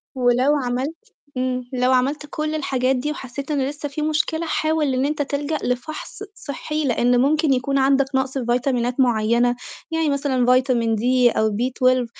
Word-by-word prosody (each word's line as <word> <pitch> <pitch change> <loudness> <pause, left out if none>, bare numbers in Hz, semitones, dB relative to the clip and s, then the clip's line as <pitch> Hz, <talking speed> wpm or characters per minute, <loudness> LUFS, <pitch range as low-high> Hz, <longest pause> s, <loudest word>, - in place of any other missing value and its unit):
ولو 255 +3 +3
عملت 285 - -3 0.2
امم. 255 -1 -2
لو 250 0 +2
عملت 275 +4 +1
كل 310 +1 -3
الحاجات 265 -3 0
دي 260 +4 -2
وحسّيت 280 0 -6
إن 285 - 0
لسّه 290 0 -6
في 300 +2 -5
مشكلة، 310 +2 0
حاول 310 -3 0
إن 255 +2 +1
أنت 300 0 -1
تِلجَأ 290 +2 -2
لفَحص 255 +10 -4
صحّي، 305 +1 -4
لإن 245 0 +2
ممكن 300 +1 +2
يكون 275 +2 0
عندك 270 0 +3
نَقص 265 0 0
في 255 - -3
فيتامينات 245 0 0
معيّنة، 240 0 +2 0.4
يعني 325 -1 +1
مثلًا 275 -3 0
فيتامين 250 -3 +2
D 250 +1 +3
أو 220 0 +3
B12 255 +2 +1
265 Hz, 160 wpm, -21 LUFS, 250-295 Hz, 0.4 s, ولو